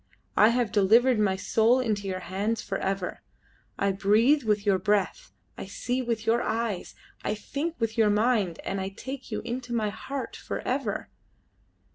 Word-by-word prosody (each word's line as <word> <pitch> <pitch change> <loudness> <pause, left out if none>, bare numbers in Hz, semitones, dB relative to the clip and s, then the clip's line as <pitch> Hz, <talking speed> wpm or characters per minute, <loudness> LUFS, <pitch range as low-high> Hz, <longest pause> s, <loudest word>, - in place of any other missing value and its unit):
I 210 - +7
have 235 -2 +1
delivered 225 +4 +4
my 195 -3 +2
soul 225 +6 +3
into 210 -5 -1
your 185 -1 -3
hands 205 +5 -2
for 195 - -3
ever; 190 -1 -2 0.6
I 200 0 +2
breathe 215 +9 +4
with 210 -3 0
your 195 -2 +3
breath, 205 - 0 0.3
I - - -6
see 245 +6 -2
with 235 -2 -2
your 235 +2 +3
eyes, 220 -4 -2 0.3
I 210 - -1
think 285 +10 -4
with 225 0 -2
your 215 -2 +5
mind, 210 -5 +2
and 195 0 -2
I 190 - -2
take 260 +7 -8
you - - -2
into 240 +1 -4
my 215 -2 +1
heart 270 +6 -5
for - - -5
ever." - - -2
215 Hz, 170 wpm, -27 LUFS, 195-240 Hz, 0.6 s, I